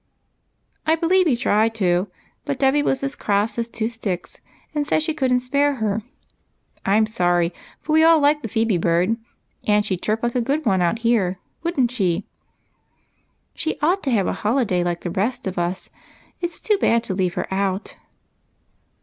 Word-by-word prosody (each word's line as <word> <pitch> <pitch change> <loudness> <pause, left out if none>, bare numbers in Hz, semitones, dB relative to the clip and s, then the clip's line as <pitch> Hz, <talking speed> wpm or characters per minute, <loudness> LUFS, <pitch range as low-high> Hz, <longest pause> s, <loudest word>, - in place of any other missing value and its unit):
" - - -48 0.3
I 320 - +5
believe 355 +2 +3
he 270 - +3
tried 225 -2 +2
to, 180 -2 +1 0.4
but 280 -2 -3
Dolly 270 +2 +3
was 270 -1 0
as 275 0 -1
cross 205 +3 0
as 230 - -1
two 225 -1 -2
sticks, 215 -6 -5 0.3
and 295 -1 -1
said 310 - +2
she 315 - 0
could 265 -4 0
n't 250 0 +2
spare 285 +2 +1
her. 220 -2 -1 0.8
I 195 - +2
'm 220 - +4
sorry, 175 -5 +1 0.3
for 310 - -2
we 315 0 +6
all 325 0 +6
like 295 +1 +3
the 230 - -4
Phebe 225 -4 +1
bird, 175 +6 +2 0.5
and 210 0 +3
she 195 - 0
'd 180 - -12
chirp 220 +2 -1
like 240 0 0
a 250 - +1
good 285 +6 -1
one 190 -2 +2
out 175 +6 +1
here, 195 -6 +2 0.2
would 340 -4 -2
n't 245 -2 +3
she? 190 -6 0 0.4
" - - -45
" - - -45
She 320 - -2
ought 360 +5 +3
to 275 - -2
have 210 -7 +2
a - - 0
holiday 210 -6 +1
like 175 -1 -2
the 175 - -4
rest 210 +8 -1
of 190 -2 -3
us. 175 +2 -3 0.5
It 345 - -1
's 340 - -7
too 420 -2 +1
bad 230 -8 +3
to 205 - -3
leave 185 -2 -1
her - - -1
out. 195 0 -2
225 Hz, 205 wpm, -22 LUFS, 190-280 Hz, 0.8 s, we